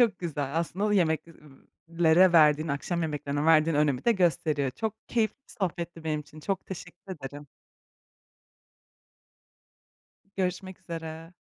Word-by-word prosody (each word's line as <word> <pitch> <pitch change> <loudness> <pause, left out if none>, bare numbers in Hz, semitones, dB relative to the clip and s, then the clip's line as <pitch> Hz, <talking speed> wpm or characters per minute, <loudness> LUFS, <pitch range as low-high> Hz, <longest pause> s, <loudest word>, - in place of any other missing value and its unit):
Çok 220 -6 +3
güzel. 145 -5 -3
Aslında, 175 +4 -2
o 210 - +1
yemek 165 -6 +2
ıı 150 -4 -18 0.3
lere 170 +3 +6
verdiğin, 155 -1 +5
akşam 165 +5 -2
yemeklerine 145 -2 -2
verdiğin 160 -1 +4
önemi 145 -4 +1
de 235 - +5
gösteriyor. 165 - +1
Çok 220 - -3
keyifli 220 -3 +1
bir - - -13
sohbetti 170 -3 -3
benim 155 -1 -1
için. 150 +1 -13
Çok 190 +3 -3
teşekkür 185 +1 -8
ederim. 145 -1 -9 2.9
Görüşmek 185 0 -3
üzere. 165 0 -7
165 Hz, 130 wpm, -28 LUFS, 150-185 Hz, 2.9 s, lere